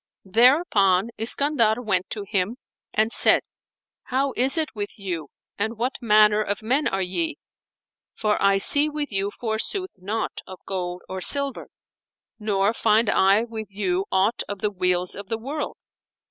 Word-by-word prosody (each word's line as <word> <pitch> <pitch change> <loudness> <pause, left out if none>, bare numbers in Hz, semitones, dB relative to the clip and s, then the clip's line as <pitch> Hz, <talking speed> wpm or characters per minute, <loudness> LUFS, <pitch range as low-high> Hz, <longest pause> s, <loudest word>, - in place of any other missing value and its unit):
Thereupon 220 - +3
Iskandar 230 -1 +2
went 195 -6 0
to 210 - -4
him 205 +3 -1 0.3
and 220 +1 +1
said, - - +5 0.6
"How 270 +1 -1
is 265 +5 +1
it 315 -3 -1
with 205 -2 -5
you 175 -7 -4 0.3
and 220 +2 -2
what 250 +4 -2
manner 210 -2 +4
of 205 0 -3
men 265 +7 +1
are 195 0 -1
ye?; 315 - -2 0.8
for 210 -1 0
I 195 0 +4
see 285 +9 +5
with 300 -2 -4
you 195 0 -1
forsooth 235 - -2
naught 210 +5 -3
of 185 -1 -10
gold 180 -2 -4
or 190 0 -5
silver, 280 +4 0 0.7
nor 205 0 +1
find 220 0 +2
I 195 +3 +4
with 225 -2 -7
you 195 -2 -1
aught 195 +5 +2
of 205 - -4
the 210 -1 0
weals 180 -1 0
of 200 -1 -8
the 225 - -1
world." 280 +7 -5
215 Hz, 155 wpm, -24 LUFS, 195-245 Hz, 0.8 s, said